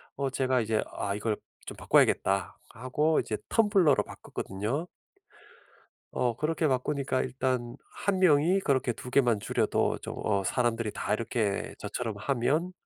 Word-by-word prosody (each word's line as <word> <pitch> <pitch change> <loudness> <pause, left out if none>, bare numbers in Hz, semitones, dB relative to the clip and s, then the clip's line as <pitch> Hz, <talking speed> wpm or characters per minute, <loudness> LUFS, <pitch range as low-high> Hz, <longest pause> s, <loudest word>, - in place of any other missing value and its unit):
어 140 -1 -1
제가 130 -1 +1
이제 110 0 0
'아 100 0 -3
이걸 105 0 -1 0.3
좀 - - -7
바꿔야겠다.' 95 -1 +2
하고 150 +6 0
이제 110 - -2
텀블러로 200 -9 +4
바꿨거든요. 110 - -4 1.2
어 120 -2 0
그렇게 155 +3 0
바꾸니까 130 0 0
일단 125 -2 -2 0.3
1 195 -2 +2
명이 175 +2 +4
그렇게 130 -7 +1
2 125 - -9
개만 125 -5 +3
줄여도 - - 0
좀 - - -6
어 100 -2 +1
사람들이 115 +1 0
다 - - -2
이렇게 110 -2 -1
저처럼 115 -4 -4
하면 140 - 0
125 Hz, 290 characters per minute, -29 LUFS, 110-150 Hz, 1.2 s, 텀블러로